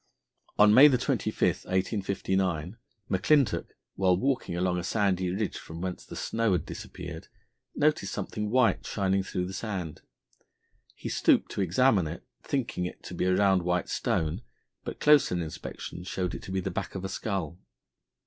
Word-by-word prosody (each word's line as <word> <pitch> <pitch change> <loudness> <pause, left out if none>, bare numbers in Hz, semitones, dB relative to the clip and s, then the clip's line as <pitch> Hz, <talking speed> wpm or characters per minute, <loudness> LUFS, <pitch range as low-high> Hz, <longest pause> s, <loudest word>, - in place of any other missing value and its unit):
On 105 0 +7
May 140 +6 +9
25, 125 -2 0 0.3
1859, 95 -2 -1 0.4
McClintock, 130 +9 +2 0.3
while 90 -2 +2
walking 130 -7 -1
along 90 0 +1
a - - -4
sandy 95 -2 +1
ridge 100 +3 -2
from 80 +1 -9
whence 90 0 -4
the - - -10
snow 115 -3 0
had 90 - 0
disappeared, 90 -3 -8 0.5
noticed 150 -10 +1
something 105 +1 -3
white 125 0 +3
shining 95 -1 0
through 90 -1 -3
the 95 - -6
sand. 95 -6 -4 0.9
He - - -7
stooped - - +2
to - - -2
examine 95 0 +3
it, 85 +3 -7 0.2
thinking 120 -9 -2
it - - -11
to - - -8
be 90 - -1
a 95 0 +3
round 95 -2 +4
white 90 0 -1
stone, 80 +6 -1 0.4
but - - -6
closer 150 -10 +5
inspection 85 +1 -6
showed 90 -1 -3
it - - -6
to - - -8
be 95 0 0
the 95 - -3
back 85 - -4
of 95 0 -4
a - - 0
skull. 95 -4 -3
95 Hz, 160 wpm, -28 LUFS, 90-105 Hz, 0.9 s, May